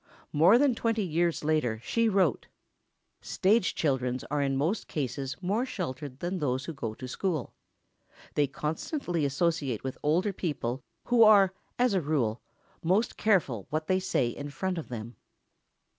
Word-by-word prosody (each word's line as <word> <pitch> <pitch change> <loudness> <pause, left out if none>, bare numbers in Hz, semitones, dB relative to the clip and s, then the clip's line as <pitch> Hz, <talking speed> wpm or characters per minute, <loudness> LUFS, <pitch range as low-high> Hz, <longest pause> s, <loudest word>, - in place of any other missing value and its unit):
More 170 +10 +6
than 275 0 +4
twenty 225 -2 0
years 170 -1 0
later 150 -8 +1
she 230 - +1
wrote: 190 - +1 0.7
Stage 215 +5 +2
children 130 -4 0
are 145 -1 +1
in 135 -1 0
most 165 +10 -1
cases 135 -1 -3
more 205 +7 +1
sheltered 145 - -5
than 180 +2 -2
those 130 -3 -1
who 165 - -5
go 115 -6 -5
to 130 - -7
school. 160 0 -2 0.8
They 145 -1 +2
constantly 160 - -2
associate 140 - 0
with 130 -1 -5
older 175 +7 +1
people 135 -8 -3 0.2
who 245 -1 +3
are, 200 -4 +7 0.2
as 245 -3 +3
a 190 - +2
rule, 130 -7 0 0.4
most 190 +7 +1
careful 160 - +1
what 155 +1 -2
they 185 +3 +2
say 180 -10 0
in 145 +4 -6
front 185 +4 -2
of 160 - -8
them. 115 0 -7
155 Hz, 155 wpm, -29 LUFS, 135-190 Hz, 0.8 s, are